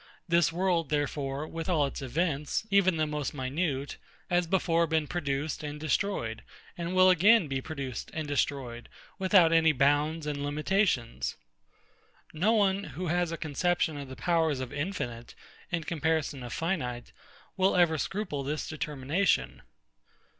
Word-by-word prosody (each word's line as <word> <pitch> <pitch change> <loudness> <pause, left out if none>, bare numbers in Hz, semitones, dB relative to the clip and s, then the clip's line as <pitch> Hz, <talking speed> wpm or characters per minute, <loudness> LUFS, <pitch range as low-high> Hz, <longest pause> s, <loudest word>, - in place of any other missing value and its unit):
This 170 -2 +3
world, 170 -3 0
therefore, 145 -1 -1
with 165 +2 -5
all 155 -5 +3
its 140 - -5
events, 150 - -1
even 185 -3 +4
the 155 - +2
most 150 -1 -3
minute, 140 +1 -2 0.3
has 175 -1 +2
before 170 -2 +2
been 160 -1 +1
produced 150 -2 -2
and 150 0 -5
destroyed, 150 - -1 0.3
and 170 +1 -4
will 185 0 +7
again 190 +1 +5
be 135 -1 -2
produced 135 -5 -5
and 160 -1 -4
destroyed, 135 -5 -2 0.3
without 185 -3 +5
any 160 -1 +5
bounds 145 +3 +2
and 145 -1 -3
limitations. 150 - 0 1.0
No 180 +8 +2
one, 200 -3 +2
who 180 -1 -5
has 175 0 +1
a 165 - -3
conception 160 +2 0
of 140 -2 -7
the 130 - -7
powers 160 -5 +1
of 130 -2 -5
infinite, 135 - -4 0.3
in 165 -2 -1
comparison 160 -3 -1
of 120 -1 -7
finite, 125 -9 -3 0.4
will 190 0 +2
ever 170 -3 +3
scruple 190 -5 -3
this 150 +3 -3
determination. 145 - -1
155 Hz, 145 wpm, -29 LUFS, 140-175 Hz, 1.0 s, will